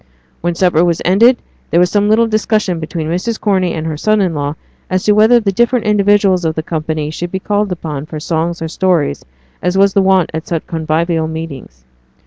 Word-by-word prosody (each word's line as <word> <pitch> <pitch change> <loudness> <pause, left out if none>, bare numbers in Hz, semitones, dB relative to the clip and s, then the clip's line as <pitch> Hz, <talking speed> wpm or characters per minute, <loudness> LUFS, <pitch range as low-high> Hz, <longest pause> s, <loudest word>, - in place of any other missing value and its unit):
When 175 0 -1
supper 175 -2 +2
was 170 -2 +1
ended, 230 +7 +4 0.3
there 170 - +2
was 180 0 +3
some 205 0 +2
little 225 +2 +4
discussion 215 -5 0
between 160 0 -4
Mrs. 185 +8 -2
Corney 190 -4 +1
and 160 0 -4
her 155 -2 -3
son 215 +6 +1
in 185 -4 +1
law 145 0 -3 0.3
as 185 0 0
to 210 - +3
whether 220 +3 +5
the 205 -3 -1
different 240 +3 +1
individuals 205 -3 +3
of 160 -1 -1
the 160 - -3
company 155 -2 -3
should 175 +2 -5
be 190 - -2
called 205 0 -1
upon 155 -4 -5
for 155 - -6
songs 165 +2 -2
or - - -2
stories, 170 - 0 0.4
as 180 +1 0
was 195 0 +4
the 200 - +3
wont 190 -3 +2
at 160 0 -5
such 165 -2 -3
convivial 160 0 -1
meetings. 145 - -8
175 Hz, 205 wpm, -15 LUFS, 160-205 Hz, 0.4 s, whether